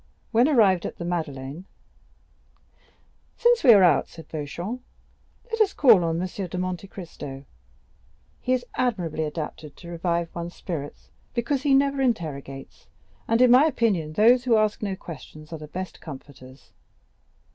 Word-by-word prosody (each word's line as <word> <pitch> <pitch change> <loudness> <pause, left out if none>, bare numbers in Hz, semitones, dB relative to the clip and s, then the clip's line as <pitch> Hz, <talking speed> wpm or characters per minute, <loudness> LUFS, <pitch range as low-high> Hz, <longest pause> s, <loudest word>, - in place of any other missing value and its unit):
When 240 +3 +4
they - - +1
arrived 195 - +4
at - - -9
the 170 - -5
Madeleine: 155 -2 -4 1.7
"Since 480 0 +3
we 255 - +9
are 200 -4 +7
out," 170 -5 +4
said 165 - -13
Beauchamp, 170 - -5 0.7
"let 455 0 0
us 405 -2 +2
call 230 - +6
on 165 0 0
M. 185 - -1
de 185 -1 -5
Monte 185 +1 -3
Cristo; 145 -8 -9 0.9
he 255 - -3
is 250 -1 -1
admirably 180 -11 -1
adapted 150 -1 -6
to 170 - -11
revive 170 0 -2
one's 170 0 -6
spirits, 150 -5 -7 0.2
because 255 +3 0
he 280 -1 +3
never 275 0 +2
interrogates, 145 - -3 0.4
and 230 +2 +4
in 250 - +6
my 255 +4 +7
opinion 200 - 0
those 240 +6 +5
who 235 -3 +4
ask 215 -1 +1
no 200 -3 -2
questions 155 -2 -11
are 160 - -5
the 150 - -9
best 185 +3 -7
comforters." 135 -3 -12
180 Hz, 155 wpm, -25 LUFS, 155-235 Hz, 1.7 s, we